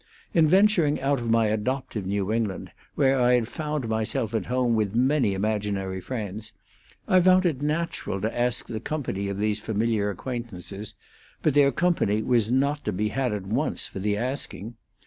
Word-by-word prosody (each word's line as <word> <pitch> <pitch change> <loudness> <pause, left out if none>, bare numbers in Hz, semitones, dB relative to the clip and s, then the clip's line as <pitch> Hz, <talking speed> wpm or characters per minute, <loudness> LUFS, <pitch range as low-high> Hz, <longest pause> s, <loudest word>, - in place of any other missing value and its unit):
In 160 -2 +5
venturing 185 -4 +4
out 135 0 +1
of 120 -1 -3
my 115 0 +4
adoptive 110 -1 -2
New 100 +1 -1
England, 110 -4 -2 0.2
where 135 -1 +3
I 125 0 +4
had 120 -2 +1
found 150 -2 -3
myself 110 0 -1
at 110 - -1
home 125 -1 +1
with 110 -2 0
many 125 -4 +2
imaginary 100 -2 -2
friends, 110 0 -5 0.5
I 185 -1 +5
found 185 +1 +5
it 150 -6 0
natural 150 -8 -2
to 110 - -2
ask 120 0 0
the 110 -2 -5
company 115 -7 -3
of 100 - -3
these 105 0 0
familiar 110 -1 0
acquaintances, 105 -2 -6 0.5
but 155 - +3
their 140 -1 +5
company 120 - +1
was 115 -2 +2
not 140 +3 +1
to 105 - 0
be 105 +2 -1
had 130 +1 -1
at 105 -2 -4
once 100 - -1
for - - -7
the 105 +1 0
asking. 120 -2 -4
115 Hz, 175 wpm, -26 LUFS, 105-135 Hz, 0.5 s, In